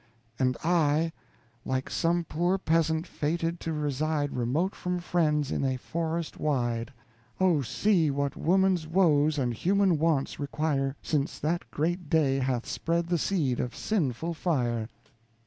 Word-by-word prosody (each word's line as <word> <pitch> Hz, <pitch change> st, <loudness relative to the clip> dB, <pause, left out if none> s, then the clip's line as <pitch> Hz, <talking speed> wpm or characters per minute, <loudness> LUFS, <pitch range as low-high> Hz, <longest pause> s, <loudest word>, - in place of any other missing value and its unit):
And 130 Hz, -1 st, +1 dB
I, 165 Hz, -1 st, +2 dB, 0.5 s
like 130 Hz, 0 st, -2 dB
some 170 Hz, +1 st, +1 dB
poor 175 Hz, +4 st, 0 dB
peasant 160 Hz, -2 st, +1 dB
fated 165 Hz, +1 st, -2 dB
to 165 Hz, -, -3 dB
reside 150 Hz, 0 st, -1 dB
Remote 140 Hz, -, 0 dB
from 180 Hz, 0 st, -3 dB
friends, 155 Hz, -5 st, +1 dB
in -, -, -1 dB
a 130 Hz, -1 st, 0 dB
forest 165 Hz, +4 st, -3 dB
wide. 120 Hz, -5 st, -1 dB, 0.5 s
Oh, 180 Hz, -6 st, +3 dB
see 160 Hz, -, +2 dB
what 140 Hz, 0 st, -1 dB
woman's 185 Hz, -1 st, +2 dB
woes 155 Hz, -4 st, +3 dB
and 125 Hz, -4 st, 0 dB
human 185 Hz, -, +2 dB
wants 155 Hz, -4 st, +1 dB
require, 140 Hz, -1 st, -1 dB
Since 145 Hz, -3 st, -1 dB
that 165 Hz, +4 st, -1 dB
great 170 Hz, +1 st, -2 dB
day 140 Hz, -4 st, +3 dB
hath 130 Hz, -2 st, -1 dB
spread 165 Hz, +3 st, -1 dB
the 175 Hz, -2 st, +1 dB
seed 145 Hz, -9 st, 0 dB
of 125 Hz, -, -3 dB
sinful 165 Hz, -, -1 dB
fire. 120 Hz, -10 st, -1 dB
155 Hz, 140 wpm, -28 LUFS, 135-170 Hz, 0.5 s, Oh